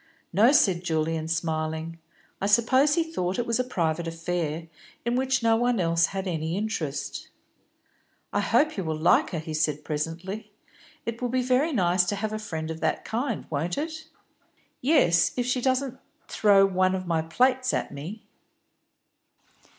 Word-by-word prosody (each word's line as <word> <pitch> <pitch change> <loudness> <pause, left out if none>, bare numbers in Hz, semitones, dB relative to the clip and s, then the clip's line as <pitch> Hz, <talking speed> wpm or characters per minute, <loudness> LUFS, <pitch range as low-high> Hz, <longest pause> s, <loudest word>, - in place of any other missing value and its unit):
"No," 220 +8 +6
said 190 - +3
Julian, 160 -1 -1
smiling. 160 0 -2 0.4
"I 195 - +1
suppose 260 +7 +4
he 335 - +2
thought 190 - -3
it 240 - -1
was 230 +1 0
a - - +3
private 170 -8 -1
affair, 165 -1 -3 0.4
in 240 +1 +1
which 265 0 +1
no 225 0 +4
one 240 -1 +1
else 170 -1 +3
had 195 0 -4
any 165 0 -2
interest." 175 -9 -3 1.1
"I - - +2
hope 310 -2 +2
you 195 - -1
will 160 -2 -2
like 160 +2 +3
her," 175 - -4
he 155 0 -5
said 150 -1 0
presently. 170 +8 -4 0.5
"It 230 +1 -4
will 245 - -1
be 255 +1 0
very 255 +6 +2
nice 180 - +3
to 205 - -1
have 215 +2 -3
a 215 - -3
friend 160 -7 -4
of 160 - -6
that - - -1
kind, 235 -1 -2
won't 160 +4 -2
it?" 320 +1 -4 0.8
"Yes, 250 - +4
if 245 - 0
she 250 0 0
doesn't 260 0 0 0.3
throw 200 -2 +5
one 185 -1 +2
of 185 -1 -4
my 165 -2 +1
own 160 - -11
plates 255 +6 +2
at - - -2
me." 165 +10 -7
190 Hz, 170 wpm, -26 LUFS, 165-245 Hz, 1.1 s, No